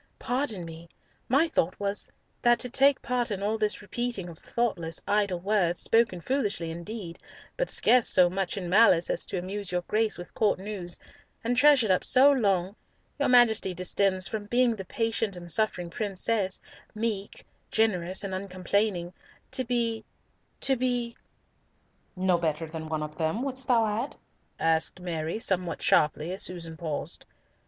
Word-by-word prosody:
"Pardon 245 -8 -2
me. 165 +1 -11 0.4
My 275 +7 +4
thought 185 - -1
was 200 0 -2 0.3
that 240 -1 +4
to 250 - -1
take 275 +1 +3
part 250 -2 -1
in 200 -2 -4
all 220 +2 -1
this 210 -1 -1
repeating 240 -7 -3
of 165 - -12
thoughtless, 175 -9 -2
idle 200 -3 +1
words, 180 -2 +1
spoken 225 -6 +2
foolishly 205 - -1
indeed, 170 +1 -7 0.4
but - - -2
scarce 250 -2 +5
so 180 -1 +6
much 185 +1 -2
in 185 -3 -4
malice 180 -3 +4
as - - -2
to - - -3
amuse 190 +2 -4
your 180 0 -1
Grace 215 +3 0
with 175 -1 -10
Court 215 -2 +1
news, 190 -3 -5 0.5
and 240 +2 0
treasured 260 -5 +5
up 185 - +2
so 270 +3 +7
long, 200 -7 +1 0.4
your 285 - +1
Majesty 225 -6 +4
descends 185 +1 +1
from 215 -2 -5
being 240 +2 +2
the 190 -3 -8
patient 225 -1 -1
and 175 -1 -6
suffering 180 -2 0
princess, 200 -1 -1 0.4
meek, 215 -3 -3 0.2
generous, 190 -5 +1
and 195 -1 -4
uncomplaining, 185 -1 -1 0.4
to 260 - +2
be—to 235 +2 -3
be—" 245 -1 -1 1.0
"No 185 -1 +1
better 160 -1 -1
than 160 0 -7
one 155 -1 -2
of 150 +1 -8
them, 160 +10 -1
wouldst 265 -2 -3
thou 235 -3 +4
add?" 220 +6 -2 0.4
asked 160 +2 +1
Mary, 165 -1 -3
somewhat 185 -6 -1
sharply, 155 +2 +2
as 190 - -2
Susan 165 -3 -2
paused. 155 -3 -4
200 Hz, 155 wpm, -27 LUFS, 175-230 Hz, 1.0 s, so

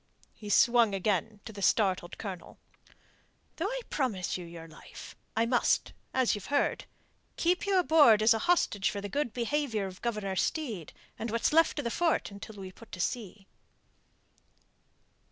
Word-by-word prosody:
He 210 - -10
swung 235 -1 +4
again 205 +2 -1
to 220 - -8
the 200 - -8
startled 190 -4 +1
Colonel. 190 -5 -7 1.0
"Though 335 - -1
I - - -3
promise 215 - -1
you 180 - -5
your 165 -1 -10
life, 155 - -12 0.2
I 225 - +3
must 245 +1 +1 0.2
as 260 -2 +2
you've 205 - -5
heard 285 0 0 0.5
keep 360 +3 +1
you 390 -1 +3
aboard 295 -11 +6
as 225 - +6
a 225 - -1
hostage 205 - +2
for 205 - -4
the 200 - -5
good 285 +1 -1
behaviour 240 -3 -1
of 185 -1 -9
Governor 210 -5 -2
Steed 220 - -2 0.3
and 225 - -3
what's 230 +6 0
left 325 0 +4
of 290 - -1
the 235 - -2
fort 335 -8 0
until 200 +2 -10
we 190 -2 -8
put 230 +4 -16
to 180 - -6
sea." 200 0 -3
220 Hz, 165 wpm, -30 LUFS, 195-275 Hz, 1.0 s, aboard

